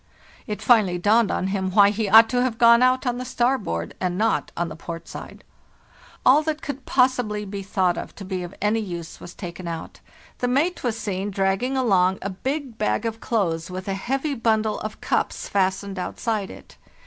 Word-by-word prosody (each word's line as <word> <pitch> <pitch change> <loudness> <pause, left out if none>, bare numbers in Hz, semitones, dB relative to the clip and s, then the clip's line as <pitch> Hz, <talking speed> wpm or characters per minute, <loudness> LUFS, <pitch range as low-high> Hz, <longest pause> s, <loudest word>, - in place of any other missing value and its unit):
It 210 -2 -4
finally 210 -7 +4
dawned 210 +4 +3
on 190 - -1
him 190 -1 -1
why 205 0 +6
he 210 -1 -2
ought 225 +2 +8
to 245 0 +1
have 250 -3 0
gone 235 0 +6
out 255 +1 +3
on 245 0 -1
the - - -3
starboard 245 - -1
and 180 -1 -1
not 220 +2 0
on 175 - 0
the 155 - -7
port 165 +1 -8
side. - - -9 0.4
" - - -26
All 280 +4 +7
that 310 0 -3
could 280 -3 -6
possibly 245 -5 +1
be 200 0 -5
thought 190 -2 -1
to 200 - -9
be 185 -1 -3
of 175 +1 -7
any 210 +2 +2
use 175 -6 -6
was 175 - -11
taken 175 -2 -7
out. 165 -1 -6 0.4
The 245 - 0
mate 295 +8 0
was 235 -3 -1
seen 200 -2 -3
dragging 195 +7 0
along 190 -7 +3
a 195 - -3
big 265 +4 -4
bag 105 - 0
of 225 0 -3
clothes 170 -7 -1
with 185 +1 -6
a 195 - -1
heavy 270 +9 -2
bundle 220 -3 +1
of 215 0 -7
cups - - -1
fastened 190 0 -1
outside 210 +1 -2
it. - - -13
210 Hz, 195 wpm, -23 LUFS, 185-245 Hz, 0.4 s, ought